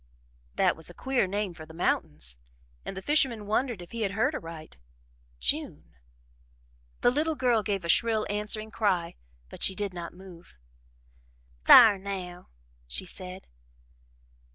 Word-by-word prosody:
That - - +3
was 160 +1 -2
a 175 - -12
queer 260 -6 0
name 200 -1 -2
for 155 -1 -11
the 160 - -13
mountains, 70 - -2 0.4
and 195 - -6
the 190 - -6
fisherman 265 -8 +2
wondered 220 -2 -1
if 170 - -15
he 230 - -5
had 200 -2 -1
heard 220 +2 +1
aright 165 - -8 0.6
June. 60 - -2 1.1
The 245 - +4
little 310 +4 0
girl 245 -5 +2
gave 195 -3 -2
a - - -3
shrill 220 +5 +3
answering 210 +1 -2
cry, 185 -7 0 0.4
but - - -11
she 190 - +3
did 200 -1 -3
not 170 -1 -6
move. 180 - -15 1.1
"Thar 205 -3 +9
now!" 185 -2 -6 0.4
she 60 - -1
said. 185 +1 -9
195 Hz, 145 wpm, -28 LUFS, 175-220 Hz, 1.1 s, Thar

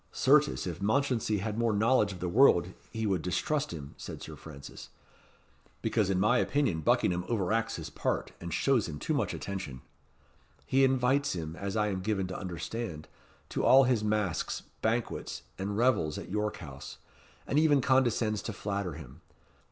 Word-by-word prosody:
"Certes, 150 +2 +3
if 85 -1 -5
Mounchensey 110 -2 +1
had 110 +2 -3
more 115 -2 +2
knowledge 110 0 +3
of 90 - -9
the 90 - -1
world 95 -4 +4 0.2
he 110 -1 -3
would 95 -5 +1
distrust 140 - -1
him," 75 -4 -7
said - - -7
Sir - - -8
Francis, 70 -4 -11 0.9
"because 105 -4 +1
in 95 -2 +1
my 110 +5 +4
opinion 135 - +1
Buckingham 90 +3 +2
overacts 110 0 0
his - - -7
part, - - -2
and 85 0 -5
shows 120 - +2
him 75 - -5
too - - -2
much - - 0
attention. 95 -10 -6 0.8
He 135 +1 +3
invites 135 +2 +2
him, 80 -2 -5
as 100 +3 -4
I 105 -1 +2
am 95 -2 -2
given 95 -1 0
to 95 - -5
understand, 90 -1 -5 0.4
to - - -2
all 135 +1 +7
his 120 -4 +2
masques, 105 -4 -1 0.2
banquets, 115 +1 -2 0.2
and 100 +1 -2
revels 110 -11 +2
at - - -7
York 105 +1 -1
House, 70 -5 -9 0.5
and 145 - +2
even 150 -3 +5
condescends 120 -5 +2
to 110 - -5
flatter 100 -3 -3
him. 75 0 -11
105 Hz, 165 wpm, -30 LUFS, 90-120 Hz, 0.9 s, all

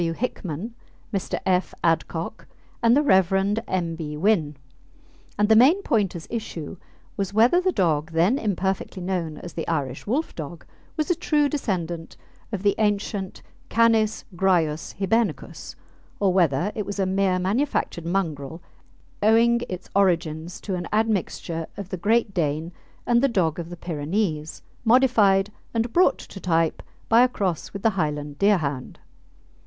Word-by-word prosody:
W. 165 -1 0
Hickman, 200 -1 -4 0.4
Mr. 195 - -2
F. 185 0 +1
Adcock, 165 +3 -1 0.3
and 235 +2 +5
the 295 - +3
Rev. 195 - +3
M. 170 -3 -1
B. 150 -2 -5
Wynn, 160 -5 +1 0.8
and 210 0 +3
the 220 - +5
main 295 - +6
point 205 -6 +1
as 165 - -7
issue 190 -7 -5 0.4
was 200 0 -3
whether 245 +11 +5
the 370 0 +2
dog 160 - +1
then 175 - +2
imperfectly 190 -2 -2
known 175 -4 -2
as 175 - -9
the 165 - -4
Irish 140 -5 -2
Wolfdog 175 - -3 0.3
was 310 +3 0
a - - +5
true 300 -3 +2
descendant 175 - -3 0.3
of 200 -3 -4
the 200 - +4
ancient 205 -2 -1 0.3
Canis 225 -2 +2
graius 170 -4 +1
Hibernicus, 200 - -1 0.4
or 195 -3 +2
whether 175 0 +2
it 210 - -3
was 200 - -4
a 195 - +1
mere 190 0 +1
manufactured 190 - -1
mongrel, 165 -5 -2 0.6
owing 230 +3 +4
its 185 0 -6
origin 165 -5 +1 0.2
to 195 - -3
an 175 -1 -3
admixture 195 -6 -1
of 200 -2 -6
the 185 - -4
Great 215 +3 +1
Dane 160 -1 -1 0.3
and 240 0 +3
the 275 - +4
dog 180 - 0
of 170 -1 -5
the 175 - -8
Pyrenees, 160 0 -2 0.2
modified 220 -5 +4 0.2
and 230 +1 0
brought 360 - +4
to 195 - -10
type 165 -3 +1 0.3
by 230 +1 +6
a 250 - +6
cross 190 -9 -2
with 195 - -7
the 225 - +4
Highland 150 -5 -3
Deerhound. 155 -11 +1
190 Hz, 150 wpm, -24 LUFS, 165-220 Hz, 0.8 s, main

